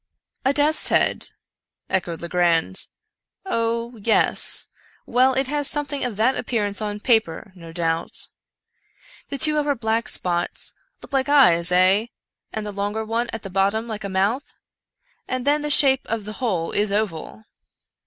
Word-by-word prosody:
" - - -46
A 270 - +4
death's 295 +2 +2
head! - - +1 0.3
" - - -56
echoed 170 -3 -6
Legrand. 175 +1 +1 0.3
" - - -58
Oh 230 +1 -1
— - - -14
yes 220 +2 +2 0.2
— - - -33
well, 255 +1 +3
it 265 +1 +1
has 290 +1 -1
something 290 -1 -2
of 240 -5 -3
that 240 +5 +3
appearance 205 -4 -2
upon 210 -1 -4
paper, 220 -6 +1
no 170 -3 -12
doubt. 165 -1 -2 1.0
The 280 - -3
two 305 +2 +4
upper 290 -1 0
black 225 -1 -1
spots 175 -1 -2 0.3
look - - -13
like 270 +1 +1
eyes, 180 -12 +5
eh? 185 +5 +4 0.4
and 220 -1 -4
the 210 - -4
longer 205 +2 -3
one 230 +2 -1
at 225 - -6
the 195 - -7
bottom 200 +4 +1
like 215 -2 -6
a 200 - -4
mouth 200 +8 -1 0.4
— - - -66 0.3
and 255 0 -3
then 295 +1 +2
the 295 - -3
shape 270 -2 +5
of 220 -2 -3
the 215 - -6
whole 185 -9 -1
is 205 0 0
oval." 205 -1 -3
220 Hz, 175 wpm, -22 LUFS, 195-260 Hz, 1.0 s, eyes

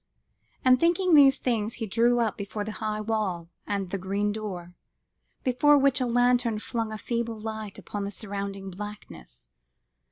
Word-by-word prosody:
and 255 -1 +6
thinking 345 +1 +3
these 280 -3 +7
things, 225 -3 -1
he 230 - -4
drew 235 +4 +3
up 225 -3 +1
before 205 +1 -4
the 215 - -5
high 215 -1 -1
wall 210 -6 -2 0.2
and 195 -3 -2
the 195 - -2
green 200 +3 -1
door, 190 -5 -6 0.7
before 280 +4 +4
which 275 -1 +3
a 250 - +1
lantern 245 -1 +2
flung 225 0 -3
a 215 - -4
feeble 230 0 -3
light 220 -2 -6
upon 205 -1 -5
the 200 - -3
surrounding 200 -2 -5
blackness. 205 - -10
215 Hz, 160 wpm, -27 LUFS, 200-245 Hz, 0.7 s, these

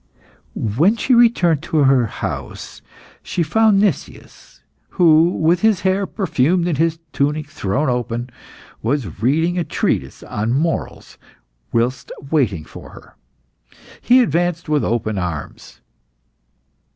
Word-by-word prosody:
When 145 - +1
she 255 - +1
returned 225 - +4
to 155 -2 0
her 130 -3 +3
house, - - -6 0.4
she 170 - -2
found 215 +4 +3
Nicias, 200 -7 -4 0.4
who, 165 -1 +5
with 170 0 +1
his 220 -4 +2
hair 190 +1 0
perfumed, 175 - 0
and 155 -5 -1
his 165 0 +1 0.2
tunic 150 +2 0
thrown 140 +1 -2
open, 120 0 -2 0.5
was 115 - -3
reading 160 +8 +1
a - - 0
treatise - - -2
on 110 +3 -2
morals 160 +5 -3 0.5
whilst 120 +2 -1 0.2
waiting 105 - 0
for - - -12
her. - - -15 0.9
He 255 +1 +5
advanced 175 - 0
with 150 -2 +1
open 110 -3 -1
arms. 85 -5 -6
155 Hz, 120 wpm, -19 LUFS, 120-175 Hz, 0.9 s, who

